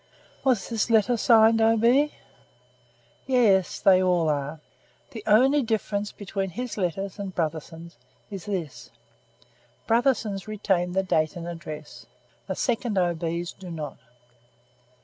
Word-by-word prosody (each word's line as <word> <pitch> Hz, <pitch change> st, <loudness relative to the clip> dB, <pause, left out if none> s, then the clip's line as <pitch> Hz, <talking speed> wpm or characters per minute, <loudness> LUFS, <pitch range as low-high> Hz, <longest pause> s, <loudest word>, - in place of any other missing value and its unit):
"Was 250 Hz, -8 st, +1 dB
this 230 Hz, -1 st, -1 dB
letter 225 Hz, +1 st, +3 dB
signed 225 Hz, -1 st, +5 dB
O. 225 Hz, +1 st, +4 dB
B.?" 260 Hz, +7 st, +3 dB, 1.1 s
"Yes; 215 Hz, -8 st, +3 dB
they 185 Hz, -1 st, +5 dB
all 175 Hz, -3 st, +2 dB
are. 145 Hz, +1 st, -2 dB, 0.5 s
The 220 Hz, -3 st, -8 dB
only 260 Hz, +7 st, +5 dB
difference 210 Hz, -3 st, -2 dB
between 195 Hz, -1 st, -4 dB
his 245 Hz, +7 st, -5 dB
letters 195 Hz, +1 st, -3 dB
and 195 Hz, -2 st, -6 dB
Brotherson's 165 Hz, +1 st, -4 dB, 0.3 s
is 195 Hz, -4 st, -7 dB
this: 180 Hz, -9 st, -5 dB, 1.0 s
Brotherson's 225 Hz, -4 st, +1 dB
retain 190 Hz, -4 st, -1 dB
the 190 Hz, +1 st, +1 dB
date 155 Hz, -4 st, 0 dB
and 170 Hz, -1 st, -6 dB
address; 155 Hz, -3 st, -8 dB, 0.4 s
the -, -, -3 dB
second 240 Hz, -4 st, -1 dB
O. 175 Hz, -2 st, +2 dB
B.'s 170 Hz, +1 st, -3 dB
do 185 Hz, -2 st, -11 dB
not." 155 Hz, -4 st, -6 dB
195 Hz, 130 wpm, -25 LUFS, 170-225 Hz, 1.1 s, signed